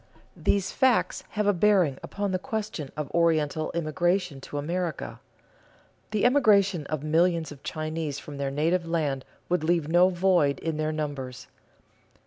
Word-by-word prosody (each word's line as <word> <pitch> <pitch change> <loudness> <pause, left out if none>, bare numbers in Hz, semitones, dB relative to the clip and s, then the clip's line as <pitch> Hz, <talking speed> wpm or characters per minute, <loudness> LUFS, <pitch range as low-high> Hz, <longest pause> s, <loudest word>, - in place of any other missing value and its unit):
These 200 -2 0
facts 260 -3 +2
have 210 -1 -1
a 205 - +4
bearing 180 -7 +3
upon 200 -1 -3
the 185 - 0
question 205 -9 -4
of 150 -2 -4
Oriental 155 -2 +1
immigration 175 -1 0
to 145 - -7
America. 155 - -3 0.9
The 215 0 0
emigration 200 - +4
of 155 -2 -3
millions 165 0 +2
of 140 -2 -11
Chinese 155 -2 -3
from 145 0 -9
their 140 -1 -1
native 165 +5 0
land 145 -5 -1 0.2
would 175 -2 0
leave 165 -2 +1
no 175 +3 +5
void 175 -6 +2
in 160 -2 -3
their 155 0 0
numbers. 140 -5 -5
165 Hz, 145 wpm, -27 LUFS, 150-185 Hz, 0.9 s, no